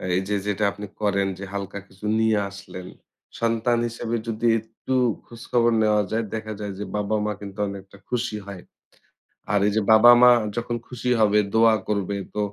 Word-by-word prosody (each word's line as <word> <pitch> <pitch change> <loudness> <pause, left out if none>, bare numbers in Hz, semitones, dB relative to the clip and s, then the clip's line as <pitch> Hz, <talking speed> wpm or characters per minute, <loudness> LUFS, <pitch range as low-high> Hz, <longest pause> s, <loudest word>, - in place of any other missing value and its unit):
এই 95 - +3
যে, 105 - +1
যেটা 105 +1 -1
আপনি 105 +1 -8 0.2
করেন। 100 -2 +1 0.3
হালকা 100 0 -5
কিছু 95 +2 -12
নিয়ে 110 -1 +3
আসলেন। 95 -2 -10 0.5
সন্তান 115 +1 +1
হিসেবে 115 0 -4
যদি 115 +1 -1
একটু 110 +4 -7 0.3
খোঁজখবর 120 0 0
নেওয়া 105 -1 +3
যায়, 115 +1 0
দেখা 110 0 -5
যায় 105 -1 -5
যে, - - -3
বাবা-মা 105 +1 -1
কিন্তু 100 0 -9
অনেকটা 100 0 -9
খুশি 120 -2 -2
হয়। 95 -3 -8 0.9
আর 105 - +3
এই - - +2
যে, 110 - +2
বাবা-মা 120 +3 +8 0.3
যখন 120 0 -2
খুশি 125 0 -4
হবে, 105 -1 +4 0.2
দোয়া 115 0 +5
করবে, 100 -1 -1 0.2
তো - - -2
110 Hz, 165 wpm, -24 LUFS, 100-115 Hz, 0.9 s, বাবা-মা